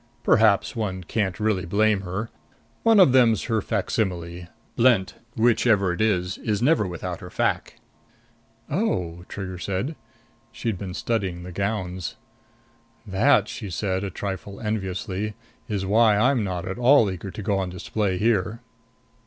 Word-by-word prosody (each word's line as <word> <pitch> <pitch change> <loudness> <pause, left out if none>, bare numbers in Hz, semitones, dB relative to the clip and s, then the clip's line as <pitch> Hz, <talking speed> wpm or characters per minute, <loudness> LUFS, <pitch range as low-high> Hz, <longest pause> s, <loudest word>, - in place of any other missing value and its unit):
"Perhaps 110 +1 +4
one 95 -5 -3
can't 95 +1 -2
really 105 -4 +1
blame 100 +3 +2
her. 100 +4 -4 0.5
One 225 -2 +5
of 180 -9 +7
them's 120 -5 +4
her 110 -2 0
facsimile. 90 -5 -2 0.3
Blent 115 -6 +3 0.2
whichever 110 -5 +3
it 90 - -3
is 95 -4 0
is 105 -2 -1
never 125 -4 +3
without 85 -2 -5
her - - -9
face." - - -1 0.9
"Oh," 90 - -2
Trigger 95 -2 -6
said. 100 - -2 0.6
She'd 110 -6 -3
been 90 -2 -5
studying 95 -6 -2
the 90 - -8
gowns. 95 -2 -3 0.9
"That," 95 -2 +3
she 105 - -6
said, 95 +1 -2
a 100 - -2
trifle 100 +1 -5
enviously, 100 -1 -3 0.3
"is 100 -4 -2
why 105 +1 +4
I'm 125 +1 +3
not 90 -2 -3
at 95 +5 -4
all 125 -4 +5
eager 95 +1 -6
to 105 - -7
go 100 -1 +1
on 95 -1 -2
display 95 +2 -2
here." 110 +1 +1
100 Hz, 145 wpm, -24 LUFS, 95-110 Hz, 0.9 s, of